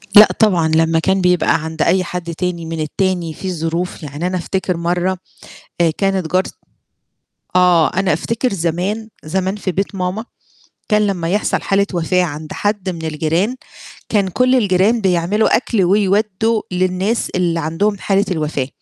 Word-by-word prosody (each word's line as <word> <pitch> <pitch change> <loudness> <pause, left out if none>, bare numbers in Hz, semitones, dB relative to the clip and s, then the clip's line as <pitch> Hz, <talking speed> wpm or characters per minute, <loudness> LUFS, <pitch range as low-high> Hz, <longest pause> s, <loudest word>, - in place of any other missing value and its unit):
لأ، 210 +1 +11
طبعًا، 180 -7 +3
لمّا 160 +1 +2
كان 190 +3 +1
بيبقى 180 -3 +2
عند 160 0 -5
أي 185 +4 +3
حد 170 -1 -5
تاني 175 -2 -3
من 165 0 -5
التاني 175 +1 -1
فيه 185 +2 -5
ظروف. 165 +1 -3
يعني 150 +4 -4
أنا 185 0 -1
أفتكر 185 0 -2
مرة 175 +2 0 0.6
آآ 165 -1 +4
كانت 195 -5 0
جارت 185 +1 +1 1.0
آه، 180 -3 +4
أنا 190 -2 +2
أفتكر 230 - -1
زمان 190 +5 -2 0.2
زمان 190 +4 -1
في 195 -3 -3
بيت 195 +2 -2
ماما 185 +4 -2 0.6
كان 210 -1 +3
لمّا 180 -5 -2
يحصل 205 +3 0
حالة 200 +1 +2
وفاة 180 +2 +1
عند 155 -1 -6
حد 205 -2 -2
من 165 -2 -7
الجيران، 165 - 0 0.5
كان 200 -3 +1
كل 250 +8 +2
الجيران 210 +1 +2
بيعملوا 190 +3 +2
أكْل 225 -4 0
ويودوا 210 +3 +1
للناس 185 +5 0
اللي 170 -2 +1
عندهم 190 +7 0
حالة 195 +1 +1
الوفاة، 150 -6 -2
185 Hz, 155 wpm, -18 LUFS, 165-200 Hz, 1.0 s, لأ